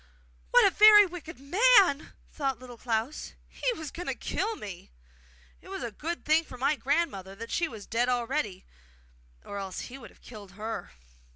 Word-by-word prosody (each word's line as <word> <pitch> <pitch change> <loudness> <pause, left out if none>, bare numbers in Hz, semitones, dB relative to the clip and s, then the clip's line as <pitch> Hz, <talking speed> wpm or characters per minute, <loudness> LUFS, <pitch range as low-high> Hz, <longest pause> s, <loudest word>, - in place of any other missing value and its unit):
'What - - +6
a - - +5
very 420 -1 +8
wicked 340 -4 -9
man!' 370 - +4 0.2
thought 275 -3 -2
Little 250 -1 -11
Klaus. 235 +4 -3
'He - - -2
was 315 -3 -6
going 355 - -7
to - - -1
kill 445 +1 -2
me! 195 - -9 0.7
It - - -16
was - - -5
a 235 - -4
good 330 +10 -5
thing 310 +2 +4
for 255 - -11
my 275 +4 +1
grandmother 270 - -1
that 230 +3 -8
she 340 - +1
was 220 -8 -10
dead 240 +2 0
already, 240 -5 -2 0.8
or 200 - -6
else 190 -2 -5
he 265 +2 -9
would 235 - -11
have - - -24
killed 205 -5 -11
her! 220 +3 -5
265 Hz, 180 wpm, -28 LUFS, 220-330 Hz, 0.8 s, very